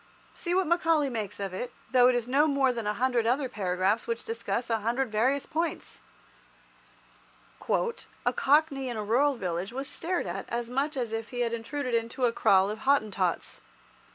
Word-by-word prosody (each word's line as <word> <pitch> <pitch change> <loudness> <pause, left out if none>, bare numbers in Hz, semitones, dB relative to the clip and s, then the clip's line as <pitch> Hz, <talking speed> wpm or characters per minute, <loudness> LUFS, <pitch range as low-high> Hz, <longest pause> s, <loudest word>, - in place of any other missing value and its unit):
See 345 0 -2
what 380 0 +3
Macaulay 325 -4 +2
makes 210 -4 -4
of 195 -2 -3
it, 240 +6 -4 0.2
though 250 -1 +6
it 250 - +4
is 240 -1 -1
no 280 +4 +4
more 275 -3 +2
than 230 -3 -4
a 210 - 0
hundred 245 -1 +1
other 265 +3 +1
paragraphs 195 0 0
which 230 0 -2
discuss 230 +1 -3
a 225 - +2
hundred 235 +3 -1
various 255 +6 +1
points— 330 +1 -3 1.7
"A 470 -1 -1
cockney 280 -2 +2
in 240 - -4
a 215 - -2
rural 265 +7 +2
village 180 -2 -3
was 270 +3 -4
stared 355 +2 -2
at 190 +2 -5
as 235 0 -3
much 275 +3 -1
as 235 -3 -2
if 225 0 -3
he 245 -1 -3
had 235 -1 0
intruded 250 +3 -3
into 230 +2 0
a 235 - +3
kraal 195 -3 +4
of 215 - -6
Hottentots. 215 -10 0
245 Hz, 180 wpm, -28 LUFS, 220-275 Hz, 1.7 s, though